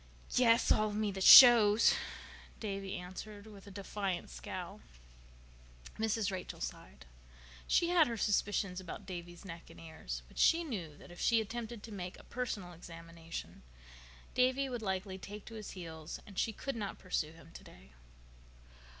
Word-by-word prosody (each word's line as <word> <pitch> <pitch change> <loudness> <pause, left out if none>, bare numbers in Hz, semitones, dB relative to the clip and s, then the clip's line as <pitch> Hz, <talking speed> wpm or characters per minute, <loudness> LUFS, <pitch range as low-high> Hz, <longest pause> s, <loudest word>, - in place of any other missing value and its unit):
"Yes—all 230 -3 +4
of 205 - -5
me 210 -1 0
that 190 -1 -3
shows," 230 -3 +10 0.7
Davy 195 -2 -4
answered 200 +3 -8
with 205 -2 -13
a - - -8
defiant 195 - -4
scowl. - - -7 1.2
Mrs. 220 -2 0
Rachel 185 -1 -6
sighed. 60 - -7 0.6
She 340 - +3
had 345 -3 +5
her 230 -1 -3
suspicions 200 -3 0
about 185 +2 -8
Davy's 175 0 -8
neck 170 -2 -9
and - - -14
ears. 60 - -7
But - - -11
she 335 +1 +5
knew 180 - -6
that - - -14
if 175 - -12
she 230 -1 +3
attempted 225 0 -5
to 225 - -9
make 185 -3 -6
a - - -14
personal 210 -8 -4
examination 165 - -9 0.7
Davy 260 +2 +2
would 245 -2 -4
likely 190 -1 -3
take 205 +2 -9
to 230 - -10
his 215 -2 -7
heels 160 -3 -7
and 195 -2 -6
she 225 - +1
could 275 +5 -5
not 205 -3 -4
pursue 160 -4 -2
him 165 0 -16
today. 60 +1 -14
200 Hz, 155 wpm, -33 LUFS, 175-220 Hz, 1.2 s, shows